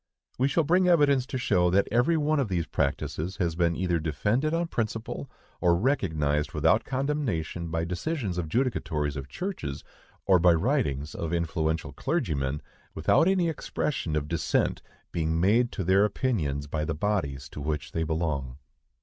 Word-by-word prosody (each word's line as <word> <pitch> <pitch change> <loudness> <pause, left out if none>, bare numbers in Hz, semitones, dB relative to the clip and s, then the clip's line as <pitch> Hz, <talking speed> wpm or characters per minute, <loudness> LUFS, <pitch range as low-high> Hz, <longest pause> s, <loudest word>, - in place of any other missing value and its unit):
We 130 - +4
shall 160 +4 +2
bring 180 +4 +3
evidence 145 -7 +4
to 130 - -3
show 90 -8 +2
that 100 +3 +3
every 120 +9 +3
one 155 0 +1
of 135 - +1
these 90 -4 -1
practices 80 +6 -2
has 85 -3 0
been 85 -1 +2
either 90 -1 0
defended 105 - 0
on 170 +1 +1
principle, 115 -2 -3 0.3
or 85 -2 +4
recognized 80 - 0
without 90 +9 +3
condemnation, 130 - -2
by 80 0 -1
decisions 95 - -2
of 80 -3 -3
judicatories 75 - -1
of 70 -1 -6
churches, 180 - -5 0.4
or 95 -2 +5
by 85 0 +6
writings 80 - 0
of 80 -1 -4
influential 80 -1 -1
clergymen, 70 0 -1 0.3
without 165 - +3
any 185 -3 +3
expression 145 - -2
of 75 -1 -1
dissent 85 +1 0 0.3
being 80 -1 0
made 115 +7 +3
to 95 - -2
their 95 +3 +4
opinions 95 - 0
by 75 +1 -2
the 80 0 -2
bodies 75 -8 -1
to 75 - -8
which 75 -1 -3
they 80 - -2
belong. 75 -5 -2
90 Hz, 160 wpm, -27 LUFS, 80-130 Hz, 0.4 s, by